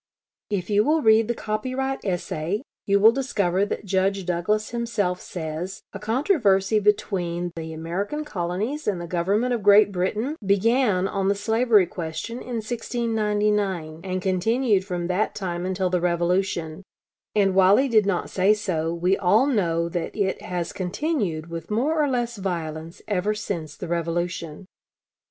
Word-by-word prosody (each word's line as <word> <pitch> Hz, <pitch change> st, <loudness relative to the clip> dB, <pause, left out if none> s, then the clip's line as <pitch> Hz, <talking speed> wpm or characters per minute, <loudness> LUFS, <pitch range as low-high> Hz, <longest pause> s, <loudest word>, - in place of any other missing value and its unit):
If 200 Hz, -1 st, -2 dB
you 205 Hz, +1 st, +4 dB
will 305 Hz, +3 st, +2 dB
read 220 Hz, 0 st, +5 dB
the 240 Hz, -, -1 dB
copyright 255 Hz, +6 st, -3 dB
essay, 180 Hz, +2 st, -2 dB, 0.2 s
you 200 Hz, 0 st, +4 dB
will 220 Hz, +3 st, +8 dB
discover 200 Hz, -7 st, 0 dB
that -, -, -4 dB
Judge 195 Hz, 0 st, 0 dB
Douglas 185 Hz, +5 st, 0 dB
himself 215 Hz, -6 st, -1 dB
says, 165 Hz, +2 st, -5 dB
a 200 Hz, -, -6 dB
controversy 215 Hz, -, +2 dB
between 175 Hz, -4 st, 0 dB
the 160 Hz, -1 st, -6 dB
American 185 Hz, -, -3 dB
Colonies 205 Hz, -, -3 dB
and 200 Hz, -4 st, 0 dB
the 170 Hz, -, -5 dB
Government 195 Hz, +8 st, 0 dB
of 235 Hz, -, -1 dB
Great 205 Hz, +1 st, +6 dB
Britain 210 Hz, -, -1 dB
began 200 Hz, 0 st, +2 dB
on 195 Hz, -1 st, -1 dB
the 200 Hz, -, +3 dB
slavery 220 Hz, 0 st, +3 dB
question 175 Hz, +7 st, -5 dB
in 250 Hz, -1 st, -6 dB
1699, 210 Hz, -7 st, -1 dB
and 185 Hz, -1 st, -3 dB
continued 205 Hz, +3 st, +2 dB
from 180 Hz, -3 st, -3 dB
that 185 Hz, +4 st, 0 dB
time 180 Hz, -2 st, -3 dB
until 185 Hz, -1 st, -1 dB
the 180 Hz, -1 st, +1 dB
Revolution; 175 Hz, -1 st, 0 dB, 0.5 s
and, 195 Hz, -2 st, +3 dB
while 190 Hz, +1 st, +6 dB
he 275 Hz, -, +3 dB
did 215 Hz, -5 st, +3 dB
not 185 Hz, -3 st, -1 dB
say 195 Hz, +3 st, +3 dB
so, 165 Hz, -6 st, -2 dB
we 175 Hz, +3 st, +1 dB
all 205 Hz, +8 st, +3 dB
know 170 Hz, -11 st, +1 dB
that 170 Hz, 0 st, -4 dB
it 195 Hz, -3 st, -1 dB
has 175 Hz, -2 st, -4 dB
continued 185 Hz, -, -2 dB
with 165 Hz, -1 st, -7 dB
more 295 Hz, +9 st, +1 dB
or 290 Hz, -, +1 dB
less 240 Hz, -3 st, -1 dB
violence 165 Hz, -4 st, -5 dB
ever 205 Hz, +1 st, 0 dB
since 170 Hz, -8 st, -5 dB
the -, -, -6 dB
Revolution.... 170 Hz, 0 st, -3 dB
195 Hz, 155 wpm, -24 LUFS, 175-220 Hz, 0.5 s, will